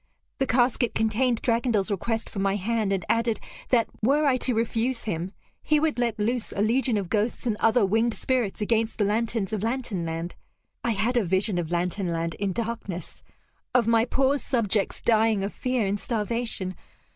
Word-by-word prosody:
The 270 Hz, -, +1 dB
casket 245 Hz, 0 st, +2 dB
contained 225 Hz, +2 st, +1 dB
Dragondel's 230 Hz, -4 st, +1 dB
request 225 Hz, +3 st, -2 dB
for 200 Hz, -, -6 dB
my 195 Hz, 0 st, +1 dB
hand, 215 Hz, +1 st, 0 dB
and 190 Hz, -3 st, -1 dB
added 230 Hz, -1 st, +1 dB, 0.3 s
that, 235 Hz, -3 st, +3 dB
were 285 Hz, +7 st, +3 dB
I 270 Hz, -3 st, +4 dB
to 250 Hz, -1 st, 0 dB
refuse 230 Hz, +2 st, 0 dB
him, 175 Hz, -3 st, -3 dB, 0.3 s
he 305 Hz, -1 st, +2 dB
would 310 Hz, -4 st, 0 dB
let 235 Hz, -2 st, 0 dB
loose 230 Hz, +2 st, -1 dB
a 200 Hz, -, -2 dB
legion 240 Hz, +1 st, +2 dB
of 195 Hz, -3 st, -2 dB
ghosts 215 Hz, +6 st, -1 dB
and 230 Hz, -3 st, +1 dB
other 225 Hz, -1 st, +4 dB
winged 225 Hz, +4 st, +1 dB
spirits 245 Hz, -5 st, -1 dB
against 225 Hz, +1 st, 0 dB
the 210 Hz, -, +2 dB
lanterns 220 Hz, 0 st, -1 dB
of 210 Hz, -, -1 dB
Lantern 230 Hz, -5 st, -2 dB
Land. 165 Hz, +1 st, -4 dB, 0.5 s
I 235 Hz, -, 0 dB
had 225 Hz, +5 st, +1 dB
a 235 Hz, -, +3 dB
vision 190 Hz, +1 st, +1 dB
of 165 Hz, -2 st, -3 dB
Lantern 180 Hz, +2 st, -1 dB
Land 165 Hz, -1 st, -2 dB
in 200 Hz, -1 st, 0 dB
darkness; 205 Hz, -4 st, -5 dB, 0.5 s
of 245 Hz, -3 st, +5 dB
my 230 Hz, 0 st, +4 dB
poor 270 Hz, +3 st, +1 dB
subjects 215 Hz, -7 st, 0 dB
dying 220 Hz, -3 st, +3 dB
of 200 Hz, -, -3 dB
fear 255 Hz, -4 st, 0 dB
and 200 Hz, +1 st, -1 dB
starvation. 220 Hz, -4 st, -2 dB
225 Hz, 180 wpm, -26 LUFS, 200-240 Hz, 0.5 s, of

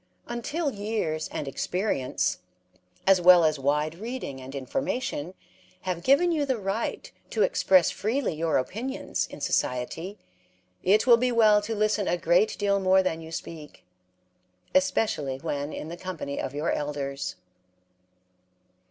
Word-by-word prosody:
Until 285 Hz, +6 st, -2 dB
years 205 Hz, -8 st, -2 dB
and 145 Hz, -, -4 dB
experience, 180 Hz, -2 st, -1 dB, 0.7 s
as 190 Hz, -2 st, +5 dB
well 175 Hz, -1 st, +8 dB
as 155 Hz, -2 st, +1 dB
wide 150 Hz, +3 st, +1 dB
reading 225 Hz, -, -5 dB
and 130 Hz, +2 st, -9 dB
information, 185 Hz, -, -3 dB, 0.5 s
have 180 Hz, -2 st, -3 dB
given 280 Hz, -, +4 dB
you 310 Hz, -3 st, +1 dB
the 265 Hz, -3 st, 0 dB
right 200 Hz, +2 st, -3 dB, 0.2 s
to 440 Hz, -, +1 dB
express 195 Hz, -, +4 dB
freely 235 Hz, +1 st, -1 dB
your 160 Hz, 0 st, 0 dB
opinions 225 Hz, -, -3 dB
in -, -, -10 dB
society, 160 Hz, +11 st, -1 dB, 0.6 s
it 205 Hz, +4 st, +3 dB
will 240 Hz, -2 st, +7 dB
be 250 Hz, +1 st, +1 dB
well 215 Hz, -3 st, +5 dB
to 220 Hz, +2 st, -3 dB
listen 215 Hz, -1 st, +1 dB
a 175 Hz, -, +1 dB
great 175 Hz, +6 st, +2 dB
deal 200 Hz, -1 st, +1 dB
more 190 Hz, 0 st, +4 dB
than 165 Hz, -3 st, -2 dB
you 160 Hz, 0 st, -10 dB
speak, 160 Hz, -2 st, -8 dB, 0.9 s
especially 220 Hz, -, +1 dB
when 145 Hz, +2 st, -3 dB
in 150 Hz, -, -6 dB
the 170 Hz, -, -7 dB
company 170 Hz, -7 st, -5 dB
of 140 Hz, -, -5 dB
your 150 Hz, +3 st, 0 dB
elders. 140 Hz, -8 st, -3 dB
185 Hz, 140 wpm, -27 LUFS, 150-225 Hz, 0.9 s, well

